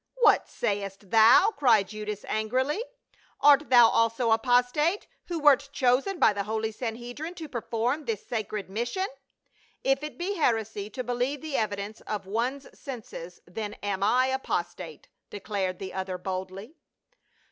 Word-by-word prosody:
"What -, -, +4 dB
sayest 200 Hz, -3 st, -3 dB
thou?" 230 Hz, -, +7 dB
cried 230 Hz, -8 st, +3 dB
Judas 210 Hz, -1 st, -6 dB
angrily. 255 Hz, -, 0 dB, 0.6 s
"Art 290 Hz, 0 st, +5 dB
thou 240 Hz, -2 st, +8 dB
also 230 Hz, +1 st, +2 dB
apostate, 250 Hz, -, +2 dB, 0.2 s
who 345 Hz, -, -4 dB
wert 285 Hz, -2 st, +4 dB
chosen 270 Hz, +9 st, +1 dB
by 220 Hz, -, +4 dB
the 200 Hz, -1 st, -3 dB
holy 220 Hz, +1 st, -2 dB
San 225 Hz, 0 st, -4 dB
hedrim 245 Hz, +9 st, -7 dB
to 325 Hz, -3 st, -7 dB
perform 245 Hz, +3 st, -2 dB
this 225 Hz, -4 st, -3 dB
sacred 215 Hz, -3 st, -4 dB
mission 235 Hz, -, -2 dB, 0.3 s
?" -, -, -44 dB
" -, -, -36 dB
If 270 Hz, -, -7 dB
it 300 Hz, 0 st, -7 dB
be 375 Hz, +3 st, -3 dB
heresy 220 Hz, -7 st, 0 dB
to 255 Hz, +3 st, -5 dB
believe 245 Hz, +4 st, -2 dB
the 310 Hz, -3 st, -5 dB
evidence 205 Hz, 0 st, -2 dB
of 205 Hz, -2 st, -3 dB
one's 245 Hz, +7 st, -2 dB
senses 220 Hz, -, -9 dB
then 210 Hz, +3 st, -6 dB
am 200 Hz, -2 st, -2 dB
I 245 Hz, +6 st, +3 dB
apostate," 175 Hz, -, -4 dB, 0.2 s
declared 195 Hz, -3 st, -3 dB
the 190 Hz, -1 st, -7 dB
other 185 Hz, -1 st, -3 dB
boldly. 190 Hz, -, -6 dB
230 Hz, 150 wpm, -27 LUFS, 205-270 Hz, 0.6 s, thou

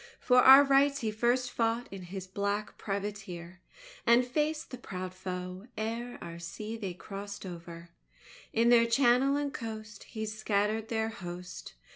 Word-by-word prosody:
For 250 Hz, -1 st, +4 dB
our 265 Hz, +2 st, +10 dB
rights 280 Hz, 0 st, +3 dB
he 220 Hz, -2 st, -1 dB
first 245 Hz, +3 st, +1 dB
fought 230 Hz, +1 st, 0 dB
in 195 Hz, -, -7 dB
his 190 Hz, +1 st, -6 dB
"black 200 Hz, +2 st, -2 dB
privateer," 195 Hz, -3 st, -5 dB, 0.4 s
And 235 Hz, +1 st, +5 dB
faced 300 Hz, +4 st, -1 dB
the 255 Hz, -, -7 dB
proud 185 Hz, -5 st, -6 dB
foe, 185 Hz, +2 st, -6 dB
ere 230 Hz, +3 st, -3 dB
our 170 Hz, 0 st, -7 dB
sea 210 Hz, +6 st, -6 dB
they 195 Hz, -6 st, -5 dB
crossed 200 Hz, +3 st, -7 dB
over 170 Hz, -1 st, -9 dB, 0.6 s
In 230 Hz, +1 st, +3 dB
their 235 Hz, -1 st, +6 dB
channel 255 Hz, +3 st, +4 dB
and 290 Hz, -1 st, -2 dB
coast, 215 Hz, -3 st, -7 dB
He 220 Hz, -1 st, -5 dB
scattered 215 Hz, 0 st, 0 dB
their 220 Hz, -1 st, 0 dB
host. 180 Hz, -, -8 dB
215 Hz, 150 wpm, -31 LUFS, 185-240 Hz, 0.6 s, our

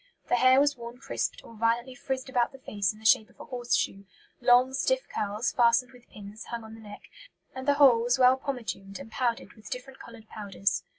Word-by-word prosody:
The 245 Hz, -, +3 dB
hair 255 Hz, +2 st, +6 dB
was 285 Hz, 0 st, +3 dB
worn 235 Hz, 0 st, -9 dB
crisped 260 Hz, -, -3 dB
or -, -, -13 dB
violently 230 Hz, +3 st, 0 dB
frizzed 265 Hz, 0 st, -4 dB
about 245 Hz, -2 st, +1 dB
the 270 Hz, -, -13 dB
face 205 Hz, -7 st, -2 dB
in 215 Hz, -, -15 dB
the 220 Hz, -, -17 dB
shape 215 Hz, 0 st, +4 dB
of -, -, -26 dB
a -, -, -9 dB
horse 245 Hz, -1 st, -1 dB
shoe; 195 Hz, 0 st, -2 dB, 0.3 s
long 250 Hz, +2 st, +5 dB
stiff -, -, 0 dB
curls, 210 Hz, +3 st, -2 dB
fastened 240 Hz, +1 st, +3 dB
with 245 Hz, -1 st, -19 dB
pins, 210 Hz, +1 st, -11 dB
hung 235 Hz, -1 st, -6 dB
on 220 Hz, 0 st, -11 dB
the 225 Hz, -, -12 dB
neck; 205 Hz, -1 st, -11 dB, 0.5 s
and 260 Hz, +1 st, -7 dB
the 285 Hz, -, +4 dB
whole 265 Hz, -5 st, +6 dB
was 245 Hz, +2 st, +1 dB
well 255 Hz, 0 st, +6 dB
pomatumed 235 Hz, -8 st, -5 dB
and 225 Hz, -, -11 dB
powdered 240 Hz, -2 st, -2 dB
with 215 Hz, -, -14 dB
different 265 Hz, +1 st, -7 dB
coloured 230 Hz, -2 st, -13 dB
powders. 200 Hz, -2 st, -2 dB
240 Hz, 220 wpm, -28 LUFS, 220-260 Hz, 0.5 s, hair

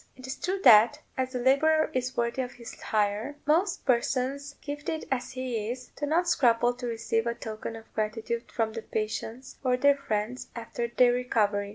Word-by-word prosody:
It 255 Hz, -, -11 dB
is 265 Hz, +1 st, -4 dB
true 380 Hz, +2 st, -2 dB
that, 230 Hz, +7 st, +7 dB, 0.2 s
as 260 Hz, 0 st, -1 dB
the 255 Hz, -, -3 dB
labourer 280 Hz, +5 st, +3 dB
is 255 Hz, 0 st, -2 dB
worthy 235 Hz, +2 st, 0 dB
of 245 Hz, -1 st, -5 dB
his 235 Hz, -1 st, -10 dB
hire, 210 Hz, +5 st, 0 dB
most 345 Hz, +5 st, +1 dB
persons 270 Hz, +3 st, 0 dB
gifted 290 Hz, +2 st, -4 dB
as 265 Hz, 0 st, -2 dB
he 245 Hz, -4 st, -3 dB
is 250 Hz, +1 st, -6 dB
do 290 Hz, -, -3 dB
not 340 Hz, +4 st, +2 dB
scruple 240 Hz, -5 st, +3 dB
to 245 Hz, 0 st, -6 dB
receive 225 Hz, 0 st, -1 dB
a 235 Hz, -, -1 dB
token 225 Hz, -1 st, -6 dB
of 225 Hz, 0 st, -13 dB
gratitude 225 Hz, +2 st, -3 dB
from 225 Hz, -2 st, -1 dB
the 225 Hz, -, -4 dB
patients 225 Hz, +4 st, -4 dB
or 250 Hz, -1 st, +2 dB
their 280 Hz, +2 st, +4 dB
friends 235 Hz, -2 st, -3 dB
after 235 Hz, 0 st, -4 dB
their 245 Hz, +1 st, +4 dB
recovery. 210 Hz, -5 st, +1 dB
245 Hz, 185 wpm, -28 LUFS, 225-270 Hz, 0.2 s, that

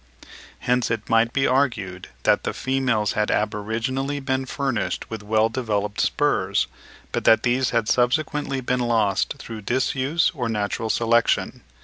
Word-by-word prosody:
Hence 125 Hz, -1 st, +1 dB
it 115 Hz, -1 st, -3 dB
might 115 Hz, +1 st, +4 dB
be 135 Hz, +1 st, +1 dB
argued 105 Hz, -9 st, 0 dB, 0.2 s
that -, -, +3 dB
the -, -, -3 dB
females 130 Hz, -6 st, 0 dB
had 105 Hz, 0 st, 0 dB
aboriginally 115 Hz, +7 st, -1 dB
been 130 Hz, -1 st, -2 dB
furnished 120 Hz, -10 st, -2 dB
with 110 Hz, -2 st, -5 dB
well 110 Hz, +1 st, +2 dB
developed 105 Hz, -4 st, -2 dB
spurs, -, -, +1 dB, 0.5 s
but -, -, -2 dB
that 110 Hz, -, +5 dB
these 125 Hz, +1 st, +2 dB
had 115 Hz, -2 st, 0 dB
subsequently 135 Hz, +3 st, +1 dB
been 125 Hz, 0 st, 0 dB
lost 110 Hz, -5 st, +1 dB
through 110 Hz, -2 st, -8 dB
disuse 130 Hz, -, +1 dB
or 125 Hz, -7 st, -3 dB
natural 110 Hz, +1 st, -2 dB
selection. 115 Hz, +1 st, +1 dB
120 Hz, 140 wpm, -23 LUFS, 110-130 Hz, 0.5 s, that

